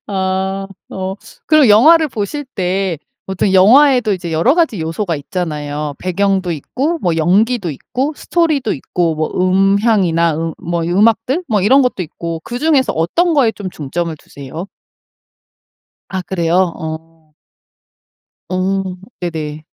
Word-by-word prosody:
아. 190 0 -2 0.2
어. 190 0 -4 0.3
그리고 305 -6 +5
영화를 310 +10 +6
보실 245 +5 -4
때 185 -3 -1 0.3
보통 190 +1 0
영화에도 245 +4 +5
이제 175 -3 -4
여러 170 - +3
가지 325 - +1
요소가 165 +2 -2
있잖아요. 150 -2 -4
배경도 190 0 0
있고 275 - -2
뭐 170 -2 0
연기도 195 +4 +2
있고 255 - -3
스토리도 310 -8 0
있고 165 +4 -1
뭐 155 0 -2
음향이나 190 -3 +2
음 165 0 -2
뭐 170 0 -3
음악들? 225 - +2
뭐 215 -4 +2
이런 265 +7 +5
것도 250 -7 -1
있고 165 0 -6
그중에서 260 +1 +1
어떤 330 - +1
거에 255 -7 +3
좀 200 -3 -7
중점을 165 +2 -4
두세요? 145 +6 -9 1.4
아 190 - -3
그래요. 170 -2 -1 0.2
어. 160 -1 -9 1.1
어 190 +1 0 0.4
네네. 155 -3 -5
190 Hz, 265 characters per minute, -16 LUFS, 165-230 Hz, 1.4 s, 영화를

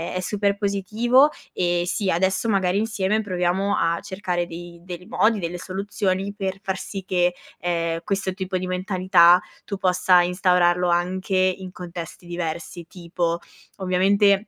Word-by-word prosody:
è - - 0
super 200 +1 0
positivo 220 +7 +3 0.2
e, 175 -1 +1
sì, 190 +2 -1
adesso 190 +5 +1
magari 190 -2 +2
insieme 215 -1 0
proviamo 185 0 0
a 165 0 +1
cercare 190 -3 -3
dei 170 0 -9
dei 180 0 -8
modi, 220 +1 +2
delle 175 -1 -4
soluzioni, 195 +1 -2
per 190 -2 -3
far 190 -1 -2
sì 195 0 -6
che, 180 -1 +2 0.3
ehm, 170 -1 -1
questo 195 -2 -1
tipo 185 -1 -3
di 185 0 -4
mentalità 185 -1 +4 0.2
tu 200 - -4
possa 185 -1 +4
instaurarlo 180 0 +2
anche 185 +3 0
in 185 0 +1
contesti 175 -1 -8
diversi. 170 0 -5
Tipo, 170 -1 -2 0.4
ovviamente 195 +2 +3
185 Hz, 140 wpm, -23 LUFS, 175-195 Hz, 0.4 s, mentalità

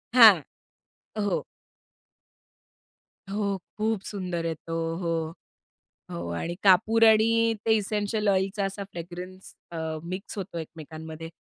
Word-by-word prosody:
हां. 215 -8 +10 0.8
हो. 205 -1 0 1.9
हो. 200 -1 0 0.2
खूप 220 -2 0
सुंदर 180 -4 -3
आहे 165 - 0
तो. 165 +1 -3
हो, 165 -2 -2 0.8
हो. 85 0 -4
आणि 170 +1 -3
कापूर 215 +4 +5
आणि 225 +1 +4
ते 225 - +3
इसेंशियल 210 0 -1
ऑइलचा 195 +1 +1
असा 195 +1 -4
फ्रॅग्रन्स 180 +2 -8 0.2
अ, 170 - -5 0.3
मिक्स 185 +4 -6
होतो 185 -3 -5
एकमेकांमध्ये 160 0 -8
190 Hz, 110 wpm, -27 LUFS, 165-210 Hz, 1.9 s, हां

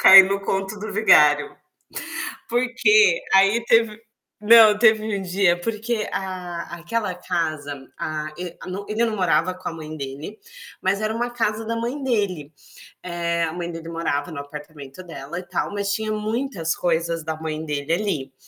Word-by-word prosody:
Cai 195 0 +11
no 195 +1 -1
conto 195 +1 -2
do 215 +1 -5
vigário. 150 -8 +5 0.9
Por 240 +1 +1
quê? 430 - +5
Aí 200 +4 +4
teve 225 -2 +3 0.4
não, 215 -1 +7
teve 220 -1 +5 0.2
um - - -5
dia 180 -1 +2
porque 225 +2 -2
a 180 -3 -5
aquela 185 +4 -2
casa, 160 -5 -3 0.2
a 155 0 -4
e 180 -1 -6
no 195 +2 -6
ele 215 +2 +1
não 225 -2 -1
morava 180 -1 +2
com 185 - -6
a - - -8
mãe 155 -1 -8
dele, 140 +8 -7 0.4
mas 195 +2 +1
era 215 - 0
uma 240 +1 -1
casa 225 -2 -1
da 230 - -1
mãe 240 +5 -3
dele. 190 - -1 0.5
Eh, 170 -1 -1
a 160 - -2
mãe 175 0 -4
dele 165 0 -8
morava 165 -1 -2
no 155 - -6
apartamento 145 +1 -10
dela 165 0 -7
e - - -11
tal, 175 +2 -3
mas 200 0 -1
tinha 215 +1 -1
muitas 215 -5 -2
coisas 165 -1 -1
da 160 0 -2
mãe 160 0 -4
dele 145 0 -2
ali. 170 -9 -2
185 Hz, 170 wpm, -23 LUFS, 160-215 Hz, 0.9 s, Cai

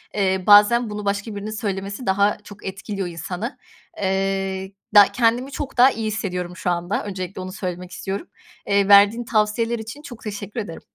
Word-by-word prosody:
eee, 190 -2 +1
bazen 210 +3 +6
bunu 210 0 -5
başka 205 +2 -2
birinin 205 +2 -5
söylemesi 200 +1 -4
daha 200 +2 +2
çok 205 0 -13
etkiliyor 195 0 -4
insanı. 180 - -5 0.4
Eee, 195 0 -1 0.2
da 205 - +11
kendimi 245 +3 +1
çok 275 -2 -6
daha 255 +2 +7
iyi 225 -3 -3
hissediyorum 180 -4 -3
şu 180 - -2
anda 175 +3 -1
öncelikle 185 -2 -5
onu 185 0 -6
söylemek 180 -1 -5
istiyorum. 195 - -5 0.4
Eee, 200 -1 +3
verdiğin 205 +4 +6
tavsiyeler 225 +1 +1
için 225 +6 -8
çok 250 -6 -11
teşekkür 210 +1 -5
ederim. 185 -6 -6
205 Hz, 165 wpm, -22 LUFS, 190-220 Hz, 0.4 s, da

